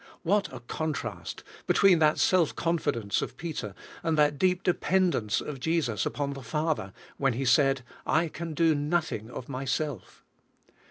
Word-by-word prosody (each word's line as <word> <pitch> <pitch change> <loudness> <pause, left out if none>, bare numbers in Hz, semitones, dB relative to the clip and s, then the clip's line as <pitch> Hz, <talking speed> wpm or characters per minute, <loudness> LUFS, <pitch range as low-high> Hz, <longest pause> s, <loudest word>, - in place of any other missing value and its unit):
What 200 +3 +1
a 130 -2 -8
contrast 155 +5 -4 0.2
between 190 -4 +5
that 155 -1 +4
self 180 -5 +3
confidence 145 -11 0
of - - -5
Peter, 145 - -5 0.3
and 160 -1 0
that 145 -1 +3
deep 185 +1 +2
dependence 180 - +1
of 145 -3 -6
Jesus 130 - 0
upon 140 -1 -2
the 135 - -8
Father, 150 -4 -1 0.3
when 135 -3 +2
He 135 +3 -2
said: 135 +1 +4 0.2
"I 165 +2 +2
can 160 0 -6
do 165 0 +4
nothing 145 -7 -1
of 125 - -7
myself." 135 -2 -4
150 Hz, 150 wpm, -28 LUFS, 130-165 Hz, 0.3 s, between